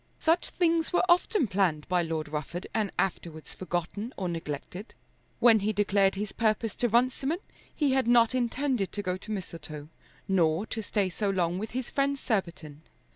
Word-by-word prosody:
Such 330 +2 +2
things 335 -2 +1
were 355 - +3
often 360 - +3
planned 185 -7 0
by 180 -1 +2
Lord 160 -2 -3
Rufford, 155 +4 -5
and 215 -2 0
afterwards 165 -4 -3
forgotten 185 +6 -4
or 190 - -2
neglected. 170 - -6 0.4
When 230 -2 +6
he 210 +2 0
declared 200 -1 +2
his 205 +1 -3
purpose 220 -1 0
to 240 - +1
Runciman, 255 +7 +1 0.4
he 290 -3 +2
had 265 -2 +2
not 235 0 +5
intended 250 -3 0
to 205 - -3
go 180 -1 -1
to 205 - -12
Mistletoe, 155 -6 -6 0.4
nor 175 0 +2
to 220 0 -4
stay 205 -2 0
so 205 +3 -1
long 180 -2 0
with 215 +2 -4
his 255 - -4
friend 280 0 +1
Surbiton. 170 - -3
200 Hz, 170 wpm, -28 LUFS, 175-240 Hz, 0.4 s, When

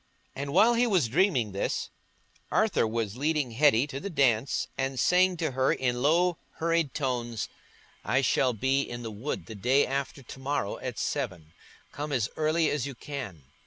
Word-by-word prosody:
And 140 +1 -4
while 215 +9 +5
he 240 +1 +3
was 185 - +2
dreaming 125 - +2
this, 100 - -2 0.6
Arthur - - +2
was 110 -1 -2
leading 150 -2 0
Hetty 130 0 +4
to 140 -2 -6
the 200 - -5
dance 135 - +1
and 135 -1 -2
saying 180 0 +4
to 160 -3 -1
her 130 +1 +2
in 125 -1 0
low 170 +4 +3
hurried 165 -4 0
tones, 120 -6 -2 0.6
"I 130 - +2
shall 130 0 +2
be 130 +5 +1
in 120 -3 -6
the 115 - -5
wood 110 +8 -4
the 110 - -8
day 125 +7 +3
after 140 0 -3
to 130 - -10
morrow 135 -6 -2
at - - -5
seven; 80 -3 -3 0.4
come 145 +2 -5
as 120 -6 0
early 155 +1 +2
as 140 -3 -1
you 140 - -7
can." 120 - -7
135 Hz, 175 wpm, -28 LUFS, 120-150 Hz, 0.6 s, while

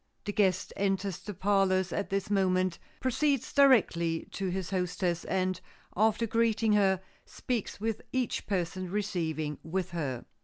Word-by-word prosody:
The 205 - -2
guest 190 -3 +1
enters 195 -2 -1
the 210 -1 -7
parlors 190 -1 +2
at 200 - -2
this 195 +1 -2
moment, 185 -2 +2 0.2
proceeds 275 +1 0
directly 180 - +4
to 195 -1 -2
his 185 0 -3
hostess, 180 -2 -1
and 185 -1 0 0.3
after 220 +2 +3
greeting 225 -1 +2
her, 190 -3 +3 0.2
speaks 240 -6 -4
with 220 0 -2
each 255 -3 -1
person 185 -1 -2
receiving 165 -7 -2
with 180 +2 -3
her. 140 -8 -3
190 Hz, 140 wpm, -30 LUFS, 180-210 Hz, 0.3 s, directly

